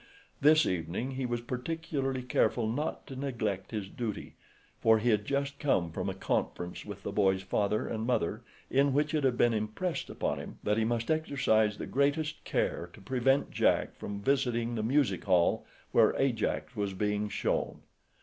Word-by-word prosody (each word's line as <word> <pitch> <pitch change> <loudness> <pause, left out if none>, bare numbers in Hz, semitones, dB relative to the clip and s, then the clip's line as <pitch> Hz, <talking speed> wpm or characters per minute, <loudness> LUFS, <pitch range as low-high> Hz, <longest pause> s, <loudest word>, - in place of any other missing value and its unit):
This 155 +2 +6
evening 90 +9 -2
he 130 -1 -2
was 120 -1 -2
particularly 135 +1 -3
careful 120 -2 +1
not 135 +8 -2
to 135 - -8
neglect 115 -8 -2
his 105 -4 -4
duty, 110 +1 -5 0.5
for 110 0 +5
he 115 +2 +2
had 105 -1 +1
just 140 +1 -1
come 90 - +1
from - - -3
a - - -4
conference 90 0 -2
with 100 -1 -8
the - - -3
boy's 95 -2 +2
father 100 +2 0
and 110 0 -3
mother 110 -3 0 0.3
in 140 +1 +3
which 150 +2 +1
it 155 -2 +1
had 130 -3 +2
been 120 -1 +4
impressed 110 +12 -2
upon - - -2
him - - -8
that 105 +1 +1
he 110 - +2
must 115 +3 0
exercise 110 -9 +2
the - - -5
greatest 145 +3 0
care 85 - -1
to - - -13
prevent 130 +6 +1
Jack - - +2
visiting 120 +2 0
the 115 - -1
music 120 -4 +1
hall 90 -3 +3 0.2
where - - +5
Ajax 125 -1 0
was 100 -2 -2
being 105 +1 0
shown. - - -1
120 Hz, 170 wpm, -30 LUFS, 105-135 Hz, 0.5 s, This